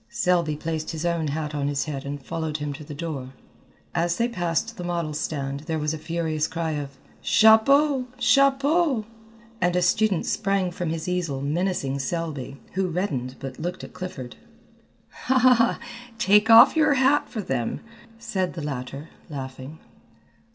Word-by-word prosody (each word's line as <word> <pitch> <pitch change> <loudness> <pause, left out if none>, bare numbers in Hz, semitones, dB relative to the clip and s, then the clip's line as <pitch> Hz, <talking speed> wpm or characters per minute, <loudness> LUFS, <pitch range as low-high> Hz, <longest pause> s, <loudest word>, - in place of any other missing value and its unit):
Selby 180 -9 +1
placed 155 +1 -4
his 160 0 -4
own 170 -2 0
hat 150 +1 -3
on 145 -1 -1
his 140 -1 -1
head 140 -3 -5
and 140 -1 -6
followed 160 -2 -3
him 150 -1 -4
to 150 +2 -9
the 145 0 -8
door. 140 -5 -5 0.6
As 170 +1 0
they 235 - +2
passed 185 +1 -2
the 180 - -5
model 170 -3 -2
stand 140 -3 -3
there 160 -1 -1
was 150 0 -1
a 160 - -5
furious 160 -1 -1
cry 165 -1 -3
of 140 -2 -5 0.2
"Chapeau! 255 +5 +5
Chapeau!" 275 +1 +3 0.6
and 175 0 +2
a 180 - +2
student 195 +1 +2
sprang 195 -3 0
from 175 -1 -3
his 160 +1 -3
easel 175 -6 -1
menacing 150 -3 -1
Selby, 140 -2 -4
who 190 0 0
reddened 145 -8 -2
but 135 -1 -7
looked 175 +3 -4
at - - -10
Clifford. 180 -9 -7 1.8
"Take 210 +1 +4
off 225 +7 +9
your 305 -3 +4
hat 270 +2 +3
for 220 - -4
them," 125 -8 -2 0.4
said 190 -5 -2
the 165 - -5
latter, 140 +1 -5 0.2
laughing. 130 +1 -7
165 Hz, 155 wpm, -25 LUFS, 145-195 Hz, 1.8 s, off